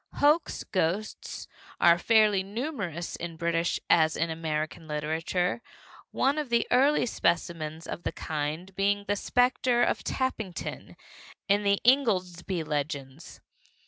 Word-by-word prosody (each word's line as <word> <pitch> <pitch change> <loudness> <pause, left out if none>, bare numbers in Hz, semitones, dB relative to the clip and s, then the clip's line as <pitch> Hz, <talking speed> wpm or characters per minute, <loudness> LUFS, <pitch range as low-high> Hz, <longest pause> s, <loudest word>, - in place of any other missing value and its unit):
Hoax 300 +3 +2
ghosts 190 +3 -2 0.3
are 170 0 +6
fairly 215 -2 +4
numerous 200 - -4
in 170 -1 -6
British 170 +1 0
as 160 -1 +4
in 165 0 0
American 160 0 -3
literature, 160 +6 -1 0.5
one 280 +3 +1
of 295 -4 -4
the 235 0 +2
early 275 +2 +4
specimens 165 -6 -1
of - - -6
the - - -2
kind 155 +4 -4
being 200 +1 +1
The 205 - +1
Specter 245 +2 +2
of - - 0
Tappington 220 -9 -4 0.5
in 200 +1 +3
the 200 -1 +2
Ingoldsby 185 - +2
Legends. 145 -1 -5
180 Hz, 120 wpm, -28 LUFS, 160-220 Hz, 0.5 s, are